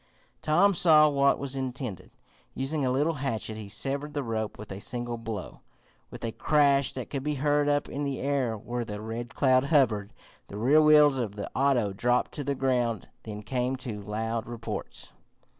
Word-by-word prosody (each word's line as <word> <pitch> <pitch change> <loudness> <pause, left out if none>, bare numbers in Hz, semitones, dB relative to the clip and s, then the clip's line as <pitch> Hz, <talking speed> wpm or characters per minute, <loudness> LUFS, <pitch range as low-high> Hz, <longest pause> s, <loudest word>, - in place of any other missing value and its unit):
Tom 180 +6 +4
saw 155 -4 +6
what 140 -1 +3
was 140 -1 -4
intended. 130 - -5 0.5
Using 140 +3 -1
a 130 - +1
little 145 +6 +1
hatchet, 115 -5 -2
he 105 -2 -8
severed 140 +7 -3
the 145 - -1
rope 110 -2 -3
with 105 0 -9
a 95 - -6
single 120 0 -3
blow. 110 -4 -6 0.5
With - - -7
a 115 - -2
crash 140 0 +3
that - - -6
could 140 - -2
be 150 +2 -2
heard 145 +1 +2
up 145 0 +1
in 145 - -4
the 140 -2 -2
air 135 -5 0
where 120 +3 -4
the 105 -2 -6
Red 115 +2 -6
Cloud 130 -1 +3
hovered, 120 -9 +2 0.4
the 100 - -8
rear 135 +8 +5
wheels 150 -3 +6
of 110 -5 -3
the 100 - -6
auto 125 -7 +2
dropped 120 +5 +1
to 145 - -5
the 140 +1 -1
ground. 125 -4 0
Then 105 -1 -7
came 125 +2 -1
two 120 -5 -6
loud 110 +2 -3
reports. 120 -1 -6
130 Hz, 185 wpm, -28 LUFS, 115-140 Hz, 0.5 s, saw